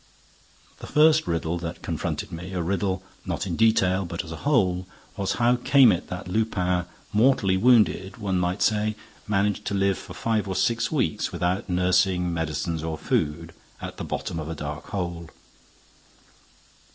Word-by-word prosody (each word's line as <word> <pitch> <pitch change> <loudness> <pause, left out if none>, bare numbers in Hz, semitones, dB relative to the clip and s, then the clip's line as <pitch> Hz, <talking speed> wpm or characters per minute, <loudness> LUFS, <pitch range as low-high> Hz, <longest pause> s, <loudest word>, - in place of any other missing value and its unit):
The - - -8
first 155 +1 +4
riddle 85 +1 -1
that 85 -1 -6
confronted - - -3
me, 85 +3 -7
a 90 - -1
riddle 95 +1 -1 0.2
not - - -3
in 90 -3 -2
detail, 100 -4 +3
but 85 -1 -4
as 85 - -10
a 80 - -5
whole, 95 -11 +1 0.3
was 100 -2 -1
how 120 +1 +3
came 130 -1 +6
it 90 -1 -2
that 90 +1 -6
Lupin, 90 -3 0 0.3
mortally 105 -4 +3
wounded, 105 -2 +3
one 95 -4 -1
might 90 +2 0
say, 110 0 +1 0.3
managed 105 -1 +1
to 100 - -1
live 95 -1 +1
for - - -10
five 110 -3 0
or 95 - -3
six 115 +4 +1
weeks 125 - 0
without 90 +2 -1
nursing, 90 0 +2
medicine 80 0 -2
or 80 -1 -3
food, 80 +3 -1 0.3
at - - -7
the - - -5
bottom 80 - -4
of 80 0 -5
a 80 - -4
dark 75 0 -6
hole? 85 -4 -4
95 Hz, 165 wpm, -25 LUFS, 85-105 Hz, 0.3 s, came